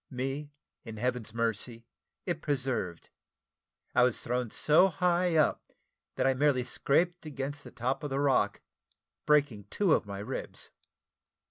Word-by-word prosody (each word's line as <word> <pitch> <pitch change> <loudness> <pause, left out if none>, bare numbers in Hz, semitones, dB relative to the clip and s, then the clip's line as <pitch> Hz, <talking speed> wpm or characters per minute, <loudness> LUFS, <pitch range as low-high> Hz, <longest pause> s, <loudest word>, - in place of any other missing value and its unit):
Me, 135 +3 -4 0.3
in 115 -2 -8
Heaven's 125 -1 -2
mercy, 115 +1 -2 0.4
it 175 -4 -2
preserved: 130 - -2 0.8
I - - +4
was 125 -2 +2
thrown 125 -1 -1
so 155 - +5
high 180 -1 +1
up, 155 -2 +1 0.4
that - - 0
I 135 - +4
merely 130 -1 +2
scraped 170 +7 0
against 145 0 -5
the - - -10
top 130 +4 -2
of 145 - -3
the 135 +1 -1
rock, 130 -8 +2 0.7
breaking 140 -9 +2
two 195 -6 +2
of - - +1
my 100 -1 -5
ribs. 105 +7 -6
135 Hz, 140 wpm, -30 LUFS, 120-150 Hz, 0.8 s, so